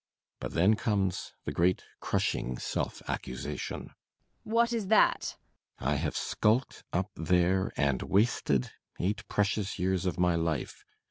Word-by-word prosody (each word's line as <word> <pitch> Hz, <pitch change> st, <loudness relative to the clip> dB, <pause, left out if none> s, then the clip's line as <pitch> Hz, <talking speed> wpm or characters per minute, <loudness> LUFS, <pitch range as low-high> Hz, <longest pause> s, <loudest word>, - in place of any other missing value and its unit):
But -, -, -5 dB
then 95 Hz, +6 st, +5 dB
comes 100 Hz, -4 st, -1 dB
the -, -, -2 dB
great, 90 Hz, +2 st, +2 dB, 0.2 s
crushing 60 Hz, 0 st, -1 dB
self -, -, -3 dB
accusation. 65 Hz, -, -4 dB
MRS. -, -, -9 dB
BORKMAN. 220 Hz, -, -15 dB
What 235 Hz, +1 st, +4 dB
is 220 Hz, -4 st, -1 dB
that? 215 Hz, +2 st, +3 dB, 0.4 s
BORKMAN. 70 Hz, +3 st, 0 dB
I -, -, +1 dB
have 75 Hz, +1 st, -1 dB
skulked 115 Hz, +5 st, +1 dB
up 95 Hz, +3 st, -1 dB
there 90 Hz, +3 st, +2 dB
and 70 Hz, -3 st, +2 dB
wasted 95 Hz, -, +2 dB, 0.3 s
eight 100 Hz, +3 st, -1 dB
precious 105 Hz, 0 st, 0 dB
years 95 Hz, 0 st, 0 dB
of 90 Hz, -, -1 dB
my 90 Hz, -1 st, +3 dB
life! 80 Hz, -4 st, -2 dB
95 Hz, 145 wpm, -30 LUFS, 80-105 Hz, 0.4 s, then